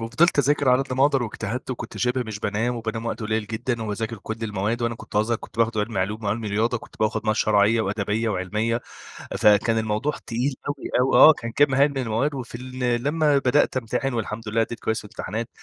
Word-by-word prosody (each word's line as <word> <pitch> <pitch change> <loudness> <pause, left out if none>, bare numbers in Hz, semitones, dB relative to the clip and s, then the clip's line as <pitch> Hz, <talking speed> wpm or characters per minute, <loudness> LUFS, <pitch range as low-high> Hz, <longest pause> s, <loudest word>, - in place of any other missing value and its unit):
وفضِلت 125 +9 +2
أذاكر 145 0 +3
على 125 +2 +5
قدّ 130 - -7
ما 135 +2 +3
أقدر 140 -3 +2
واجتهدت 115 +3 -4
وكنت 125 - -6
شِبه 125 +1 0
مش 110 -2 -5
بانام 110 +4 -1
وبانام 115 0 -4
وقت 115 - -3
قليل 110 0 -1
جدًا، 115 +1 -3
وباذاكر 110 +1 -3
كُلّ 110 +3 -5
المواد، 105 +2 -2
وأنا 115 0 0
كنت 110 - -8
أزهر، 110 +2 +2
كنت - - -13
باخد 115 -1 +2
علمي 105 -1 -1
علوم 105 +3 -3
وعلمي 105 +2 -1
رياضة، 115 +4 0
كنت - - -15
باخد 110 +1 0
مواد 110 0 +1
شرعية 105 +2 +3
وأدبية 105 +2 -1
وعلمية، 105 +5 -1 0.6
فكان 105 +2 +4
الموضوع 110 +6 0 0.2
تقيل 125 +4 -1
أوي 145 - -1 0.2
أوي. 130 +1 +2
آه، 160 - +10
كان 115 -4 -6
كَمّ 140 +2 +3
هائل 140 +2 +5
من 140 - -6
المواد، 130 +4 0
وفي 120 -2 -6
ال 125 -1 -2
لمّا 150 -1 +2
بدأت 135 0 +2
امتحن 130 +3 -2
والحمد 110 -1 -4
لله 115 +1 +1
أدِّيت 115 +1 -3
كويس 110 0 -1
في - - -11
الامتحانات، 110 +3 -5
115 Hz, 210 wpm, -24 LUFS, 110-130 Hz, 0.6 s, آه